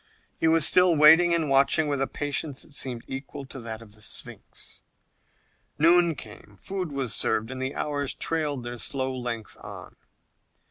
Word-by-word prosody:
He - - +2
was 160 -2 +5
still 180 -2 +5
waiting 160 +3 +7
and 165 -2 +1
watching 140 +3 +3
with 140 -2 -1
a 135 - 0
patience 145 -1 -2
that 155 - -13
seemed 125 -4 -1
equal 135 +1 -7
to 130 - -9
that 115 -1 -7
of 105 -2 -17
the 110 - -17
Sphinx. 110 - -7 1.0
Noon 170 +1 +4
came, 105 -3 -12
food 185 - -4
was 135 -5 -2
served, 110 +3 0
and 130 0 -6
the 130 +1 -3
hours 145 -2 -2
trailed 150 -5 -2
their 120 0 -7
slow 130 +1 -2
length 120 -3 -6
on. - - -10
140 Hz, 170 wpm, -26 LUFS, 125-155 Hz, 1.0 s, waiting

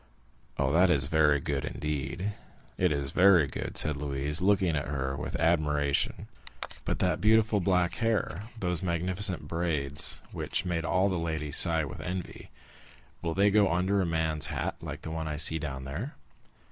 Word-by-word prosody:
"Oh, 70 -1 +1
that 90 +4 +4
is 70 -5 +3
very 75 -1 +3
good—indeed, 75 +6 -3 0.4
it 90 -2 +1
is 70 -2 -2
very 90 -3 +5
good!" 65 - -5
said 75 -1 +3
Louise, 70 +2 -1
looking 95 -4 +2
at 75 - -2
her 65 -1 -2
with 75 +1 -4
admiration; 75 -4 +1 0.6
"but - - -1
that - - 0
beautiful 110 0 +4
black 90 -1 +1
hair, 110 -4 -1
those 90 -4 -1
magnificent 90 +1 0
braids, 75 -4 0
which - - -2
made 85 -2 -2
all 95 +4 +2
the 95 -3 -1
ladies 80 -3 -1
sigh 80 -3 +3
with 70 - -8
envy,—will 90 -2 -8
they 100 +1 +4
go 100 -2 +4
under 95 +3 +1
a - - 0
man's 80 -2 0
hat - - -2
like - - -7
the 80 - -5
one 80 -1 -3
I 75 - -3
see 80 +2 +3
down 70 -3 -5
there?" 85 - -5
80 Hz, 160 wpm, -29 LUFS, 75-90 Hz, 0.6 s, very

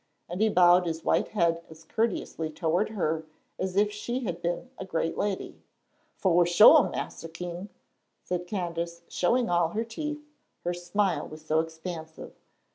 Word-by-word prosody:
and 175 +4 -4
he 220 - +4
bowed 180 -2 +5
his 160 0 -3
white - - +2
head 170 -4 +1
as 160 0 -13
courteously 180 -4 -1
toward 170 +6 0
her 160 -7 -1 0.4
as 185 0 -2
if 205 +1 +4
she 240 +5 -3
had 175 -7 -4
been 175 +9 -3
a - - -3
great 165 -3 -2
lady. 200 -2 -3 0.5
"Fo' 175 -2 +4
shore, 210 - +7
Mas'r 165 - -5
King," 175 +3 -6 0.5
said 180 0 -3
Candace, 170 -3 -3
showing 235 +7 +1
all 175 -1 +3
her 220 +6 -2
teeth, 300 +6 -5 0.4
her 175 - -1
smile 175 +2 0
was 155 0 -11
so 155 0 +2
expansive. 160 0 -6
175 Hz, 155 wpm, -28 LUFS, 165-210 Hz, 0.5 s, shore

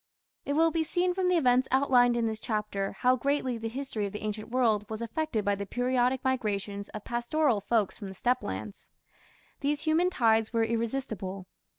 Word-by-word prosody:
It 285 - -1
will 325 +2 +4
be 325 0 +1
seen 355 +3 0
from 370 0 0
the 360 -1 +3
events 255 -4 +3
outlined 250 -3 +4
in 235 - +1
this 220 -1 -2
chapter 210 -4 -2
how 250 +6 +3
greatly 260 -2 -1
the 225 - -3
history 235 -4 -3
of 200 - -9
the 210 - -6
ancient 215 +1 -4
world 230 -4 +2
was 220 -1 -4
affected 235 0 -2
by 205 - +2
the 200 0 -4
periodic 250 +2 +1
migrations 205 -6 -2
of 215 - -8
pastoral 240 0 0
folks 215 -1 0
from 205 - -6
the 190 - -8
steppe 250 +6 +1
lands. 100 +2 -6 0.7
These 290 +1 -1
human 325 +3 +3
tides 225 -9 +2
were 230 -2 +2
irresistible. 225 -5 -3
235 Hz, 190 wpm, -29 LUFS, 210-270 Hz, 0.7 s, will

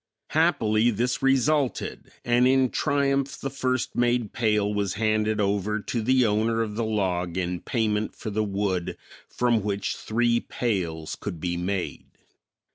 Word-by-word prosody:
Happily, 120 -9 +3
this 120 +5 -1
resulted 135 +1 +1 0.2
and 120 +1 +4
in 130 -1 +3
triumph 140 -2 0
the 135 - -4
first 130 -2 -1
made 120 -3 +1
pail 105 -2 +1
was 100 -3 -1
handed 110 0 +1
over 105 +1 0
to 115 +3 -3
the 130 +2 +3
owner 110 +2 +1
of 105 -2 -5
the 115 +2 -2
log 90 -5 -1
in 90 -1 -1
payment 110 -1 -1
for 110 - -6
the 110 +1 0
wood 100 -3 -2 0.3
from 120 -2 +1
which 100 0 -2
three 120 +1 +1
pails 85 -12 -2
could 90 -5 -6
be 85 +1 -2
made. 90 +1 -3
110 Hz, 145 wpm, -26 LUFS, 100-125 Hz, 0.3 s, and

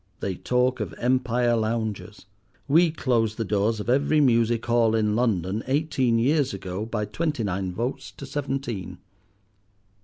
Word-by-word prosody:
They 95 - -2
talk 125 +6 0
of - - -4
Empire 125 -1 +1
lounges! 110 -2 -3 0.4
We 165 +4 +5
closed 115 -8 0
the 115 - -2
doors 105 +2 0
of 105 - -5
every 140 +5 +3
music 115 -4 +2
hall 115 -2 +3
in 105 -1 +1
London 105 -4 0
eighteen 135 -4 +1
years 135 0 +1
ago 95 +2 -5
by 105 -2 -2
twenty 145 +4 -2
nine 95 -2 -2
votes 120 +8 -4
to - - -9
seventeen. 130 -10 -4
115 Hz, 145 wpm, -25 LUFS, 105-130 Hz, 0.4 s, We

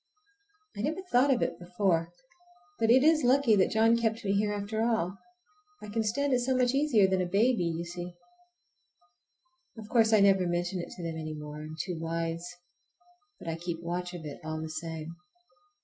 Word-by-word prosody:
I - - -4
never 320 - -2
thought 275 -5 +3
of 250 - +2
it 170 - -3
before, 175 -2 0 0.7
but 225 -1 +2
it 255 +3 +6
is 315 0 +4
lucky 250 -2 +4
that 185 - +3
John 225 +1 +4
kept 225 0 -1
me 195 - +1
here 205 +1 +1
after 205 +2 -3
all. 220 -5 0 0.6
I 210 - -9
can 225 +2 -1
stand 275 +6 0
it 250 - +3
so 255 +1 0
much 250 0 +2
easier 270 -8 +4
than 190 -1 +1
a 180 - -1
baby, 210 +1 +2
you 170 0 -2
see. 175 0 -7 1.6
Of 215 -1 -9
course 225 -2 +4
I 215 - +6
never 195 -2 +4
mention 175 +2 -1
it - - -8
to 180 - -9
them 165 -1 -4
any 155 -1 -5
more,—I 150 0 -8
am 155 +1 -8
too 175 -2 -3
wise,—but 175 - -7
I 165 - -2
keep 170 -1 -5
watch 175 +1 -3
of 165 -3 -8
it 145 - -7
all 155 0 -4
the 160 0 -5
same. 160 +1 -6
195 Hz, 190 wpm, -29 LUFS, 170-235 Hz, 1.6 s, it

